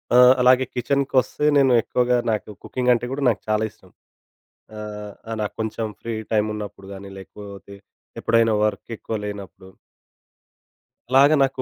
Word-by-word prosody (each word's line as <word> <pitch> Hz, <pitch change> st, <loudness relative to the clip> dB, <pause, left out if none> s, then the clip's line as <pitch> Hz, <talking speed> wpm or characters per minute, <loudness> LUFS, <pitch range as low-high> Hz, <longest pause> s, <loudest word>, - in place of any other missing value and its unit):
ఆ! -, -, +7 dB, 0.2 s
అలాగే 130 Hz, +1 st, +5 dB
కిచెన్‌కోస్తే 135 Hz, +2 st, 0 dB
నేను 135 Hz, -2 st, +4 dB
ఎక్కువగా 125 Hz, +1 st, +1 dB
నాకు 105 Hz, 0 st, -3 dB
కుకింగ్ 125 Hz, -1 st, 0 dB
అంటే 120 Hz, +1 st, -1 dB
గూడా 140 Hz, +1 st, -3 dB
నాకు 110 Hz, -, -1 dB
చాలా 110 Hz, 0 st, +2 dB
ఇష్టం. -, -, -23 dB, 0.9 s
ఆహ్, 105 Hz, -1 st, -7 dB, 0.2 s
ఆ -, -, -3 dB
నాకు 105 Hz, -, -3 dB
కొంచెం 110 Hz, 0 st, -2 dB
ఫ్రీ 115 Hz, -1 st, -4 dB, 0.2 s
టైమ్ 105 Hz, 0 st, +2 dB
ఉన్నప్పుడు 100 Hz, -2 st, -8 dB
గాని 100 Hz, 0 st, -9 dB
లేకపోతే 100 Hz, +1 st, -11 dB, 0.5 s
ఎప్పుడైనా 115 Hz, -1 st, +3 dB
వర్క్ 110 Hz, +2 st, -2 dB
ఎక్కువ 110 Hz, -, -5 dB
లేనప్పుడు 100 Hz, -2 st, -8 dB, 1.4 s
అలాగా 140 Hz, +3 st, +6 dB
నాకు 135 Hz, -1 st, -1 dB
110 Hz, 140 wpm, -22 LUFS, 105-125 Hz, 1.4 s, ఆ